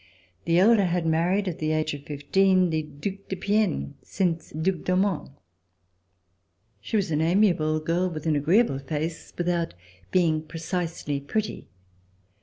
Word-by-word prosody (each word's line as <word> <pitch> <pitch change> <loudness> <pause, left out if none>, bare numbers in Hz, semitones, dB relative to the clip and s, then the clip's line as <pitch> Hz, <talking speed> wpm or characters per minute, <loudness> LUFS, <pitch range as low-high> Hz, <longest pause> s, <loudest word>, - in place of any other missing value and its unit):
The 170 0 +3
elder 205 +2 +5
had 175 -1 0
married, 175 +5 +1
at 175 - -3
the 155 0 0
age 155 -1 0
of 145 0 -8
fifteen, 185 +5 +2
the 160 0 +1
Due 155 +6 -6
de 190 - -2
Piennes, 200 - 0
since 170 -4 -2
Due 170 +5 -1
d'Aumont. 185 -1 0 1.5
She 105 - -5
was 200 -6 +1
an 150 0 +1
amiable 165 -3 +3
girl 170 +4 0
with 155 -3 -7
an 160 -2 +2
agreeable 155 - +3
face, 155 +4 -4
without 175 - -1 0.4
being 165 -4 +2
precisely 165 -2 -3
pretty. 205 +10 -3
170 Hz, 140 wpm, -26 LUFS, 155-185 Hz, 1.5 s, elder